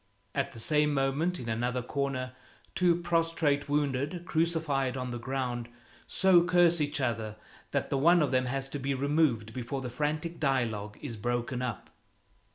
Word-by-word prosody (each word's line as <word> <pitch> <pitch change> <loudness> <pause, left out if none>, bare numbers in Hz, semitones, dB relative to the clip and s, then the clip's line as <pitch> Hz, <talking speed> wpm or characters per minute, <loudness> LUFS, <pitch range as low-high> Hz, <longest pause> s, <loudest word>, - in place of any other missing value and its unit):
At - - -1
the - - -10
same 150 +4 +2
moment, 140 +6 +1
in 120 - -6
another 120 +2 -1
corner, 135 -1 -2 0.4
two 175 -2 +3
prostrate 165 -4 +1
wounded, 145 +4 0
crucified 155 -6 0
on 125 -1 -3
the 120 - -4
ground, 125 -2 -3 0.4
so 185 -3 +5
curse 175 -2 +4
each 145 0 0
other 115 -4 -1 0.3
that - - -2
one 165 +5 +5
of 145 - 0
them 130 -1 +2
has 135 +1 -2
to 145 - -4
be 135 +1 -1
removed 135 -6 +1
before 130 +2 -4
the 125 -2 -5
frantic 155 +5 -2
dialogue 115 -7 0
is 120 -6 -5
broken 120 +3 -2
up. 120 -6 -4
135 Hz, 160 wpm, -30 LUFS, 125-160 Hz, 0.4 s, so